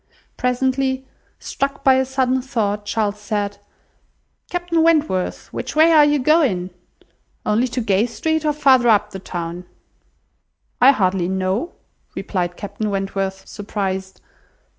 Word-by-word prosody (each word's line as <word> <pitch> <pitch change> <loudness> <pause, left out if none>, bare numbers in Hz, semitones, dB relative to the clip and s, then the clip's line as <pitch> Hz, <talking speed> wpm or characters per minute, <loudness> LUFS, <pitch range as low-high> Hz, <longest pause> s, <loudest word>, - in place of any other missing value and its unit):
Presently, 260 +1 0 0.3
struck 275 0 -3
by 265 - +6
a 265 0 +2
sudden 260 0 0
thought, 210 -5 -2
Charles 210 -1 -1
said— 205 -1 -3 0.9
"Captain 350 -2 0
Wentworth, 310 - +1
which - - -5
way 320 +2 +6
are 310 -2 +7
you 295 0 +3
going? 255 - +2 0.7
Only 225 +4 +2
to 250 +1 -3
Gay 210 +1 +2
Street, 315 +6 -1
or 305 - +2
farther 260 -4 +4
up 210 -1 +3
the 190 - -7
town?" 175 -1 -6 1.2
"I 255 - +8
hardly 185 -7 0
know," 190 - -1 0.4
replied 175 -3 -3
Captain 205 +1 -4
Wentworth, 195 -1 -3
surprised. 190 -2 -4
220 Hz, 125 wpm, -20 LUFS, 195-270 Hz, 1.2 s, I